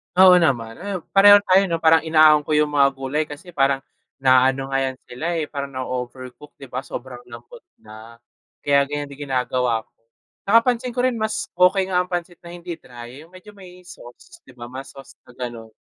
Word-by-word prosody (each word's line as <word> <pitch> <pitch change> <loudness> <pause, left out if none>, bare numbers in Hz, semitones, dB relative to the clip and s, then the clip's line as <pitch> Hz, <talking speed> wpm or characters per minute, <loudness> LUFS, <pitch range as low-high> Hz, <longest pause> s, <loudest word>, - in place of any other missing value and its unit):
Oo 185 -1 +7
naman, 120 -8 -1
ah, 190 -2 -5
pareho 205 +1 +7
tayo 195 0 +3
'no, 170 - -1
parang 160 0 +4
inaaon 155 -1 +5
ko 155 - +1
yung 150 0 +1
mga 140 -1 +4
gulay 135 +3 -2
kasi 150 +5 -11
parang 135 -3 0 0.3
naano 135 +1 +2
nga 135 - +1
'yan 130 -1 -2
sila, 125 +6 -8
eh, 160 - -1
parang 140 -2 -5
nao-overcook, 130 +2 -7
'di 135 -3 -14
ba? 125 - -3
Sobrang 130 -1 -8
lambot 120 0 -13 0.2
na, 110 +2 -13 0.5
kaya 140 -1 +2
ganyan 145 0 -5
din 140 +1 -9
ginagawa 125 -3 -1
ko. - - -42 0.6
'Tsaka 225 +3 +6
pansin 250 -1 -2
ko 250 - -1
rin 250 -3 0
mas 220 0 -3
okey 190 +1 +3
nga 180 - +2
ang 180 - -2
pancit 175 -1 -5
na 170 - -15
hindi 175 -1 -8
dry, 125 +3 -12
yung - - -29
medyo 195 +3 -14
may 180 -3 -15
sauce 180 - -15
'di - - -17
ba, 120 0 -10
mas 135 +1 -8
sauce 135 -3 -15
'pag 125 - -17
gano'n 120 -3 -7
145 Hz, 200 wpm, -21 LUFS, 130-180 Hz, 0.6 s, Oo